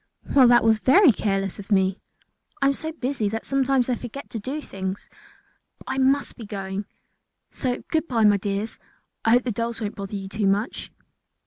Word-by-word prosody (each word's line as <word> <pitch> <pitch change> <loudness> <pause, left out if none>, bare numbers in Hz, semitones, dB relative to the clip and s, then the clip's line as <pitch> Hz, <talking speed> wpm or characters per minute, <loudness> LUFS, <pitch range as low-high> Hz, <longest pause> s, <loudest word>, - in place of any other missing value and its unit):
"Well, 260 -3 +7
that 240 0 +6
was 220 -1 +4
very 285 - +6
careless 195 -2 -2
of 200 +2 -10
me. 190 -1 +2 0.6
I 275 - +1
am 275 - +4
so 315 +3 -3
busy 255 -8 -2
that 225 +2 -4
sometimes 270 -2 +2
I 255 - +1
forget 245 +3 -7
to 225 - -4
do 265 +8 -4
things. 190 -7 -6 0.7
But - - -17
I - - -2
must 270 +2 +2
be 230 - -8
going, 195 0 -4 0.7
so 250 -2 -3
goodbye 310 -8 +1
my 205 -1 +5
dears; 200 +2 -3 0.4
I - - +2
hope 245 +1 +4
the 245 - -1
dolls 230 +2 -3
won't 210 -2 -3
bother 200 +1 -6
you 195 -1 -5
too 210 0 -1
much." 205 +5 -1
225 Hz, 190 wpm, -24 LUFS, 200-265 Hz, 0.7 s, Well